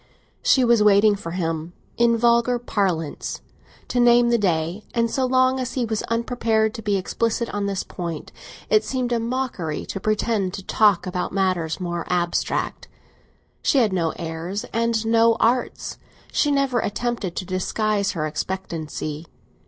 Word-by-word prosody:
She 260 -2 +4
was 235 -2 +4
waiting 210 0 +5
for 170 -4 -7
him, 165 -1 -3 0.2
in 235 0 +3
vulgar 235 +1 +3
parlance, 185 -10 -2 0.5
to 250 - 0
name 240 0 +5
the 235 - +4
day; 175 +1 0
and 230 -1 +1
so 260 -1 +1
long 255 +1 +3
as 255 -1 -3
he 250 -3 0
was 220 -1 -2
unprepared 230 -2 +1
to 225 - -7
be 205 -2 +1
explicit 230 +4 -1
on 205 -1 -1
this 195 -1 -2
point 170 -3 -6 0.4
it 215 0 +4
seemed 250 +2 -2
a 235 - +2
mockery 230 -10 -3
to 195 - -5
pretend 210 -2 0
to 195 - -7
talk 205 -2 +3
about 180 0 -3
matters 185 -4 0
more 175 -2 -3
abstract. 175 -1 -1 0.7
She - - +2
had 225 -7 +3
no 165 -3 +1
airs 170 +5 -4
and 230 -1 +1
no 230 0 +4
arts; 245 +2 0 0.3
she 295 - +2
never 275 -3 +2
attempted 220 -4 -2
to 185 - -3
disguise 200 +2 0
her 155 -4 -2
expectancy. 160 -2 -4
210 Hz, 155 wpm, -23 LUFS, 180-235 Hz, 0.7 s, waiting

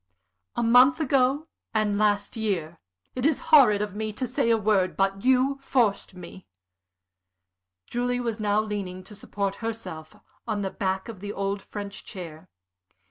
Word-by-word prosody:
"A 240 - 0
month 250 +5 +6
ago, 275 +1 +2 0.3
and 215 -1 +2
last 205 -1 +1
year. 180 -7 -2 0.3
It 255 - -4
is 300 0 +2
horrid 215 -9 +7
of 205 -2 -5
me 215 +1 -3
to 255 - -3
say 245 -1 0
a 230 - +4
word. 200 -4 +1
But 195 0 0
you 260 +2 +3
forced 230 -8 0
me." 180 +1 -11 1.4
Julie 245 - -1
was 230 -2 -3
now 210 0 +2
leaning, 195 -4 -5
to 195 - -12
support 200 -1 -4
herself, 220 -9 -6 0.3
on 210 -3 -1
the 190 - -2
back 190 +1 -2
of 220 -5 -9
an 205 0 -5
old 195 0 -2
French 200 0 -7
chair. 165 -2 -9
210 Hz, 155 wpm, -26 LUFS, 195-240 Hz, 1.4 s, horrid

